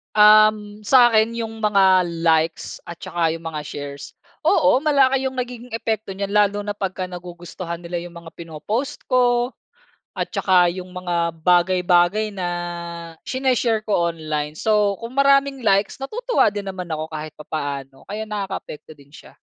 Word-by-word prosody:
Um, 215 0 +5
sa'kin 230 -1 +4
yung 225 -1 -5
mga 190 -3 +4 0.2
likes 160 0 +1
at 170 0 -10
tsaka 170 -2 -1
yung 165 0 -6
mga 155 -2 -4
shares. 140 -1 -7 0.3
Oo, 260 - +3
malaki 270 -3 +3
yung 260 - -11
nagiging 250 -1 -5
epekto 220 -2 -3
n'yan 200 +1 -4
lalo 205 0 +2
na 205 - -2
'pagka 190 -2 -3
nagugustuhan 175 -1 -7
nila 175 0 -5
yung 175 -1 -10
mga 165 -1 -13
pino-post 205 - -5
ko 245 0 +2 0.6
at - - 0
tsaka 180 -2 +3
yung 185 -1 -8
mga 170 -2 -2
bagay-bagay 180 +4 +2
na 180 -2 -3 0.7
shine-share 250 -4 0
ko 170 -5 +1
online. 155 -2 -4
So, 210 -2 +2
kung 230 +2 -8
maraming 275 -1 +3
likes 200 +5 +1
natutuwa 475 - +1
din 205 -1 -6
naman 185 -3 -6
ako 155 0 -3
kahit 155 0 -5
papaano 140 -3 -5
kaya 215 +2 -4
nakakaapekto 195 -7 -6
din 140 +1 -20
siya. - - -15
195 Hz, 150 wpm, -21 LUFS, 170-225 Hz, 0.7 s, Um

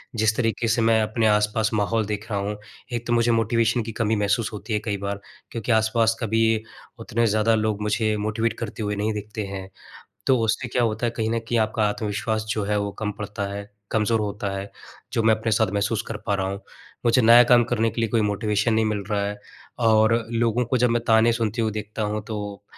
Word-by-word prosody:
जिस 110 -1 +2
तरीके 115 -1 0
से 115 +1 +2
मैं 115 0 +4
अपने 110 +1 +1
आसपास 105 +1 +2
माहौल 110 +1 +1
देख 105 +1 -5
रहा 100 - 0
हूँ, 105 +1 -3 0.4
एक 120 0 -3
तो 120 - +1
मुझे 120 0 +3
मोटिवेशन 115 +1 +2
की 115 - -5
कमी 110 -1 +2
महसूस 105 +1 0
होती 105 +2 -5
है 105 - +2
कई 105 -3 -1
बार। 100 0 -4 0.3
क्योंकि 115 +1 -3
आसपास 110 0 +3
कभी 115 0 +1 0.6
उतने 115 +2 0
ज़्यादा 110 +1 +2
लोग 110 -1 -1
मुझे 105 +1 0
मोटिवेट 110 +2 -1
करते 110 -1 -5
हुए 105 0 -1
नहीं 105 +2 -1
दिखते 105 0 -5
हैं, 95 -1 -6 0.6
तो 130 -1 +4
उससे 115 +3 0
क्या 125 +1 0
होता 115 +1 0
है, - - +1
कहीं 110 -1 -1
न 115 - +1
कहीं 115 +1 -1
आपका 110 0 +1
आत्मविश्वास 110 +1 -2
जो 110 -2 -1
है 105 +1 0
वो 100 0 -3
कम 105 -1 -1
पड़ता 105 0 -4
है, 100 +1 -7 0.2
कमज़ोर 110 +1 +1
होता 105 -1 -3
है, 100 +1 -6 0.4
जो 115 - +1
मैं 110 0 +5
अपने 110 +1 -2
साथ 105 -1 +2
महसूस 105 +2 0
कर 115 - -4
पा 100 - +1
रहा 95 -1 -1
हूँ। 100 0 -5 0.5
मुझे 120 +2 +4
नया 115 +2 +8
काम 120 0 +5
करने 115 -1 0
के 115 - -4
लिए 115 -2 0
कोई 115 - +2
मोटिवेशन 105 +1 0
नहीं 110 0 +2
मिल 105 -2 -1
रहा 100 -1 +1
है 105 0 -5 0.5
और 110 0 +4 0.2
लोगों 115 +1 +1
को 120 +2 0
जब 125 0 +3
मैं 120 0 +1
ताने 110 +1 +5
सुनते 115 0 -1
हू 110 - +1
देखता 105 +1 -5
हूँ, 105 0 -2
तो, 105 -2 -6
110 Hz, 225 wpm, -24 LUFS, 105-115 Hz, 0.6 s, नया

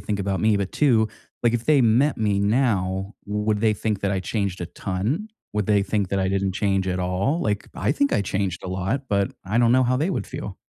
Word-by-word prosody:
think 105 -1 -3
about 95 -1 -1
me, 110 -1 +3
but 100 -1 -2
2, 115 -7 +3 0.3
like, 120 0 +3
if 120 - -1
they 150 -3 +4
met 125 +6 +3
me 105 -2 +1
now, 100 -3 0
would 105 +1 0
they 110 -1 +3
think 105 -1 -2
that 100 - 0
I 95 - 0
changed 100 -2 -2
a 85 - -3
ton? 105 - -3 0.3
Would 105 -2 0
they 105 -2 +3
think 100 -1 -1
that 100 +1 -1
I 95 - +1
didn't 95 0 0
change 95 -1 0
at 90 0 -1
all? 95 - 0
Like, 105 -1 -1
I - - 0
think 285 0 +1
I 100 - +2
changed 95 -2 -2
a 95 - -4
lot, 95 +9 -1
but 100 -1 +1
I 105 +4 0
don't 120 0 +4
know 130 - +5
how 130 0 +2
they 155 +7 0
would - - -2
feel. 130 -8 -6
105 Hz, 240 wpm, -23 LUFS, 95-115 Hz, 0.3 s, know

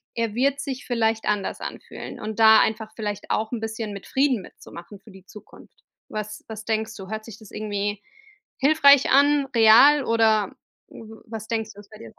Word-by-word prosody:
Er 230 -2 -2
wird 280 +2 0
sich 265 -3 -6
vielleicht 225 -3 -1
anders 205 -2 -2
anfühlen - - -8
und 215 +1 -6
da 220 0 +7
einfach 220 0 -2
vielleicht 210 -3 -5
auch 220 0 -1
'n 240 - -3
bisschen 220 -1 -5
mit 200 - -9
Frieden 265 -5 +1
mitzumachen 185 +2 -13
für 210 - -17
die 190 -1 -16
Zukunft. 210 +2 -16 0.3
Was 215 0 -6
was 220 -1 -8
denkst 220 0 -2
du? 195 -3 -10
Hört 215 0 -6
sich 225 -2 -12
das 215 -3 -15
irgendwie 205 -1 -4 0.6
hilfreich 280 -1 +5
an, 285 +1 +4
real, 245 +6 +6
oder 220 -3 +2 0.4
w 220 0 -13
was 220 -2 -8
denkst 220 -2 -3
du 205 - -15
was 205 - -16
bei 215 - -14
dir? 115 - -12
220 Hz, 185 wpm, -23 LUFS, 210-235 Hz, 0.6 s, da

